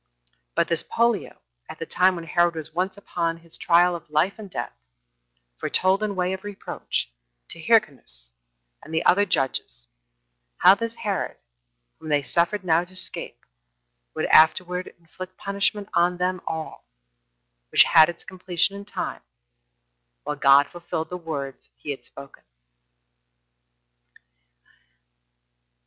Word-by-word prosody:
But - - +2
this 170 - 0
Pollio, 235 -2 0 0.3
at - - -8
the - - -5
time 185 +1 +3
when 170 - -6
Herod 175 +1 +2
was 155 -1 -5
once 185 +3 -2
upon 170 -4 -2
his 165 0 -7
trial 175 +1 +4
of 165 -3 -10
life 160 +8 +1
and 205 -2 -9
death, - - -5 0.9
foretold, 190 +2 +2
in 210 -2 -1
way 180 0 0
of 190 +1 -6
reproach, 205 - -4 0.4
to 165 - -8
Hyrcanus 135 - +1 0.5
and 155 - -13
the 160 +1 -1
other 205 +3 +4
judges, 135 - -1 0.7
how 190 - +8
this 230 +2 -3
Herod, 200 -5 -3 0.6
whom 155 - -8
they 145 -1 +2
suffered 175 +8 +1
now 170 -1 +3
to 180 +1 -14
escape, 185 - -2 0.7
would - - -1
afterward 180 +3 +4
inflict 185 +3 -10
punishment 200 0 -1
on 175 +1 +2
them 180 0 -1
all; 160 - -5 0.8
which - - +7
had 160 -1 +6
its 170 - -6
completion 185 -1 -1
in 200 0 -8
time, 205 - -5 1.0
while 150 - -3
God 140 0 +6
fulfilled 170 -1 -5
the - - -3
words 145 -6 -6
he 145 - -5
had 140 - -7
spoken. 140 0 -13
175 Hz, 135 wpm, -24 LUFS, 160-190 Hz, 1.0 s, how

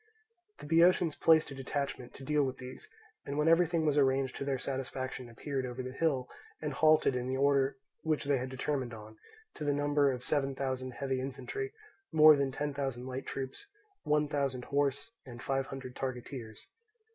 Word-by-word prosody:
The - - -10
Boeotians 165 +1 +4
placed 160 -2 +4
a - - -5
detachment 135 -2 -4
to 135 - -10
deal 150 +2 +2
with 130 -1 -1
these, 130 0 -9 0.3
and 140 +1 -4
when 150 +1 +2
everything 165 -1 +4
was 150 -1 +3
arranged 135 -1 +2
to - - -3
their 135 -1 0
satisfaction 130 -1 -4
appeared 135 +3 -3
over 130 0 -4
the 130 - -5
hill, 135 -3 0 0.3
and 150 -2 -3
halted 155 -3 +4
in 125 0 -2
the 130 +1 -1
order 140 -1 +3 0.2
which 155 -2 0
they 140 -2 +2
had 130 +1 -4
determined 130 -2 -2
on, 110 0 -12 0.3
to 155 - -7
the 145 -1 +2
number 145 -1 +3
of 125 -1 -5
seven 135 -2 0
thousand 130 -1 -3
heavy 135 -1 -2
infantry, 405 - -4 0.4
more 155 -1 +8
than 140 -1 0
ten 145 +2 -2
thousand 135 -3 -3
light 130 +1 -5
troops, 135 - -5 0.3
one 150 0 +2
thousand 140 -4 -1
horse, 140 +8 0
and 120 -3 -10
five 135 -1 0
hundred 130 -2 -7
targeteers. 125 -4 -5
135 Hz, 180 wpm, -32 LUFS, 130-145 Hz, 0.4 s, more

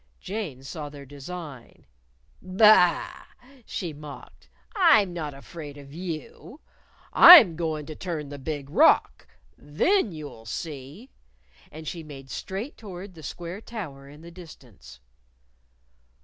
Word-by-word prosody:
Jane 185 -11 -6
saw 150 +1 -7
their 145 -1 -12
design. 145 -1 -10 0.6
"Ba 185 -2 +4 0.2
a - - -21
a!" 265 -1 -21
she 175 -5 -5
mocked. 150 -1 -12 0.3
"I'm 220 - +4
not 155 -5 -5
afraid 145 +1 -10
of 140 0 -13
you! 175 - -8 0.5
I'm 310 - +10
goin' 155 -2 -3
to 155 - -8
turn 155 -5 -5
the 145 0 -8
Big 145 0 -6
Rock. - - +3 0.3
Then 215 - 0
you'll 145 -8 -10
see!" 150 - -8 0.6
And 155 0 -10
she 170 - -5
made 135 -4 -11
straight 200 +9 -6
toward 190 -2 -10
the 165 - -13
square 175 +6 -7
tower 145 -13 -8
in 145 +2 -14
the 170 +1 -12
distance. 120 - -14
160 Hz, 130 wpm, -25 LUFS, 145-185 Hz, 0.6 s, I'm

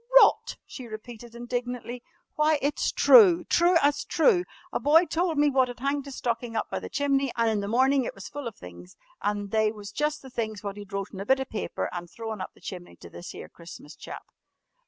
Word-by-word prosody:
"Rot?" - - +3
she 255 -3 -9
repeated 230 +1 -10
indignantly. 245 0 -4 0.3
"Why, 305 0 +3
it's 285 +1 0
true 370 -8 +7
true 345 +1 +4
as 290 0 +2
true! 365 -7 +3 0.3
A - - 0
boy 320 +5 +5
told 335 -1 -1
me 290 0 +4
wot 260 -1 +3
had 245 -1 -8
hanged 280 +1 -1
his 275 -2 -8
stocking 235 -1 -3
up 220 - -2
by - - -2
the - - -8
chimney 275 -2 +1
an' 230 -1 +2
in 215 -2 0
the 200 - -3
morning 260 +4 +3
it - - -5
was 195 - -9
full 290 -3 -6
of 230 - -7
things 90 0 -12 0.3
an' 205 0 -2
they 220 0 +2
was 205 -2 -9
jus' 300 +6 -1
the 265 -3 -13
things 220 -4 -4
wot 200 -1 -4
he'd 205 -1 -10
wrote 200 +1 -4
on 190 - -7
a 195 - -5
bit 265 0 +4
of 265 - -5
paper 215 - -3
an' 175 -1 -5
thrown 220 +1 -6
up - - -7
the - - -20
chimney 180 -2 -8
to - - -13
this 175 - -9
'ere - - -8
Christmas 165 -3 -12
chap." - - -9
240 Hz, 225 wpm, -27 LUFS, 210-285 Hz, 0.3 s, true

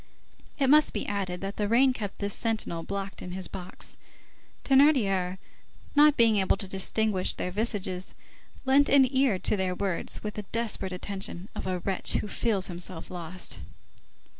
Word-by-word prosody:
It 275 - +2
must 300 +3 +5
be 210 - -2
added, 190 -3 -3
that 195 +1 -5
the 210 - 0
rain 255 +4 +4
kept 205 -5 -5
this 200 -1 -2
sentinel 220 -7 -1
blocked 195 +2 -5
in 180 - -6
his 185 0 -4
box. 185 -2 -5 0.7
Thénardier, 215 -11 +4 0.6
not 295 0 +6
being 225 -2 +5
able 195 0 +2
to 195 - -1
distinguish 195 +1 0
their 180 - -3
visages, 190 -3 -2 0.5
lent 275 +2 +4
an 275 -2 +6
ear 260 -7 +3
to 200 - 0
their 185 -2 -1
words 190 -2 -2
with 210 -1 -4
the 210 - -6
desperate 225 -4 -1
attention 190 0 -4
of - - -5
a 185 -1 0
wretch 190 +1 -1
who - - -1
feels 205 -2 0
himself 175 -1 -7
lost. 180 0 -5
200 Hz, 165 wpm, -28 LUFS, 185-230 Hz, 0.7 s, not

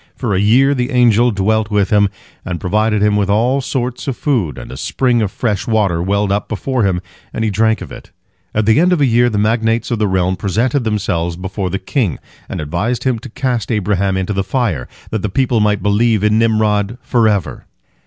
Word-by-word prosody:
For 115 -6 -2
a 95 - +1
year 125 +7 +4
the 125 -2 -1
angel 120 -2 +4
dwelt 110 +1 0
with 105 -2 +1
him, 100 -1 +4 0.3
and 90 -2 -4
provided 105 +2 +1
him 105 0 +3
with 100 -1 0
all 120 +7 +2
sorts 130 0 -3
of 135 - -2
food, 105 - -1
and - - -9
a - - -7
spring 120 - 0
of 105 -3 -1
fresh 105 -5 -2
water 100 -7 +1
welled 100 +2 0
up 100 +1 -1
before 125 +4 -2
him, 95 -3 0 0.3
and 110 - -3
he 110 - 0
drank 110 +2 +1
of - - -8
it. - - -11 0.5
At 110 0 +1
the 110 +4 +4
end 180 +2 +4
of 175 - +1
a - - +5
year, 120 0 +3
the 105 - -2
magnates 115 +2 0
of 115 - -1
the 105 - +2
realm 95 -1 0
presented 115 - 0
themselves 90 -6 -1
before 95 +1 -4
the 95 - -2
king, 100 - -1 0.3
and - - -4
advised 85 +11 -2
him 130 -3 0
to 125 - -10
cast 120 -3 -2
Abraham 100 -2 0
into 95 +2 -2
the 95 0 -1
fire, 100 - -1 0.2
that 110 - -2
the 105 - -2
people 125 +2 +1
might 105 -1 +1
believe 105 +1 +2
in 105 +1 +3
Nimrod 110 -1 +1
forever. 110 -6 0
105 Hz, 215 wpm, -16 LUFS, 100-120 Hz, 0.5 s, a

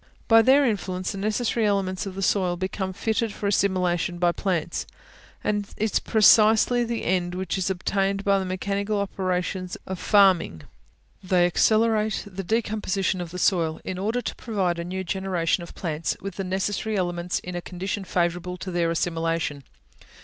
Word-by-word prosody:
By 225 0 +7
their 270 +4 +5
influence 185 -5 -2
the 200 - -6
necessary 220 +3 0
elements 195 -1 -1
of 190 - -7
the 195 - -3
soil 185 -2 +2
become 190 +1 -3
fitted 220 +4 -1
for 205 - -7
assimilation 180 -3 +1
by 175 0 +3
plants; 175 -3 -2 0.6
and 205 -1 -1
it - - -2
is - - +2
precisely 220 +2 +5
the 235 0 -3
end 175 0 0
which 190 +1 -2
is 190 -1 -1
obtained 195 +1 -1
by 200 -1 +3
the 190 - -3
mechanical 200 +3 -2
operations 185 -2 -2
of 190 -1 -5
farming. 190 - +3 0.6
They 180 -2 +3
accelerate 215 +4 +2
the 195 -1 -6
decomposition 205 -3 -1
of 175 - -5
the 180 - -7
soil, 170 -4 +1
in 185 -1 -4
order 225 +5 -1
to - - -4
provide 190 -7 -1
a - - -2
new 185 +2 -4
generation 185 -2 -1
of 170 - -10
plants 160 -3 -2
with 195 0 -6
the 195 - -3
necessary 195 +3 -1
elements 175 -1 -1
in 180 0 -6
a 175 - -3
condition 190 +3 -4
favourable 180 0 -1
to 185 - -6
their 170 -1 +1
assimilation. 165 -3 -1
190 Hz, 170 wpm, -25 LUFS, 175-205 Hz, 0.6 s, By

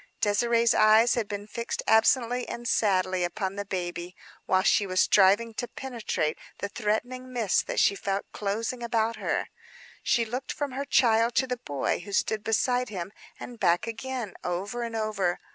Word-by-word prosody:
Désirée's 230 +2 +3
eyes 215 +2 +5
had 230 -4 -1
been 205 0 -5
fixed 230 +2 -4
absently 240 +2 +3
and 235 0 -5
sadly 185 -4 +1
upon 190 +2 -2
the 200 - -3
baby, 175 -2 -4 0.3
while 185 0 +3
she 200 - +3
was 185 0 0
striving 205 +4 +4
to 245 - -4
penetrate 230 -14 -3 0.2
the 200 - -4
threatening 245 +5 -2
mist 230 -6 +1
that - - -1
she - - +4
felt 195 0 -2
closing 225 +4 -3
about 230 -1 0
her. - - -2 0.5
She 235 -2 +2
looked 245 +4 -4
from 290 -2 -3
her 275 +2 -4
child 230 -3 +3
to 265 - +3
the 250 -1 -3
boy 145 - -2
who 200 +3 -9
stood 215 +2 0
beside 245 +3 +1
him, 190 -2 -5 0.3
and 240 -2 -9
back 175 -2 +2
again; 235 -1 -5
over 195 +7 -3
and 230 -1 -4
over. 210 -5 -1
220 Hz, 170 wpm, -27 LUFS, 195-240 Hz, 0.5 s, eyes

